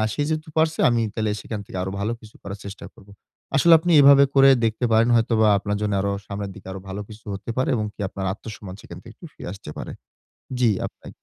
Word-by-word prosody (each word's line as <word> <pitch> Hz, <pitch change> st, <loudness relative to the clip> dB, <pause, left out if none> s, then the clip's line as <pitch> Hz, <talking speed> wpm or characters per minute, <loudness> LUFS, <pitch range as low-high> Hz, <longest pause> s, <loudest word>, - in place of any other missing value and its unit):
"সে 145 Hz, -, -1 dB
যেহেতু 155 Hz, 0 st, -3 dB
পারছে, 160 Hz, 0 st, +2 dB
আমি 120 Hz, -1 st, +1 dB
তাইলে 110 Hz, -1 st, -1 dB
সেখান 110 Hz, -3 st, -5 dB
থেকে -, -, -9 dB
আরো 95 Hz, -, -3 dB
ভালো 110 Hz, +3 st, -1 dB
কিছু 110 Hz, -1 st, -16 dB
করার 100 Hz, 0 st, -7 dB
চেষ্টা 100 Hz, +1 st, -8 dB
করব।" 105 Hz, -3 st, -19 dB, 0.5 s
আসলে 170 Hz, +4 st, +5 dB
আপনি 175 Hz, +2 st, 0 dB
এভাবে 140 Hz, 0 st, +8 dB
করে 135 Hz, 0 st, +7 dB
দেখতে 115 Hz, +2 st, 0 dB
পারেন 115 Hz, +2 st, +4 dB
হয়তোবা 115 Hz, -1 st, +3 dB
আপনার 105 Hz, +1 st, -2 dB
জন্য 105 Hz, -1 st, 0 dB
আরো 100 Hz, 0 st, 0 dB
সামনের 100 Hz, -1 st, -5 dB
দিকে -, -, -14 dB
আরো 95 Hz, -, -7 dB
ভালো 95 Hz, +2 st, -5 dB
কিছু 110 Hz, +2 st, -13 dB
হতে 100 Hz, -, -7 dB
পারে 130 Hz, -, +1 dB
এবং 110 Hz, -2 st, -1 dB
কি -, -, -13 dB
আপনার 95 Hz, 0 st, -5 dB
আত্মসম্মান 105 Hz, -2 st, -9 dB
সেখান 85 Hz, -, -10 dB
থেকে 115 Hz, -2 st, -12 dB
একটু 170 Hz, -, -12 dB
ফিরে -, -, -8 dB
আসতে 95 Hz, -6 st, -10 dB
পারে। -, -, -6 dB, 0.7 s
জি 120 Hz, -3 st, +4 dB, 0.2 s
আপনি -, -, -12 dB
110 Hz, 225 wpm, -23 LUFS, 100-130 Hz, 0.7 s, এভাবে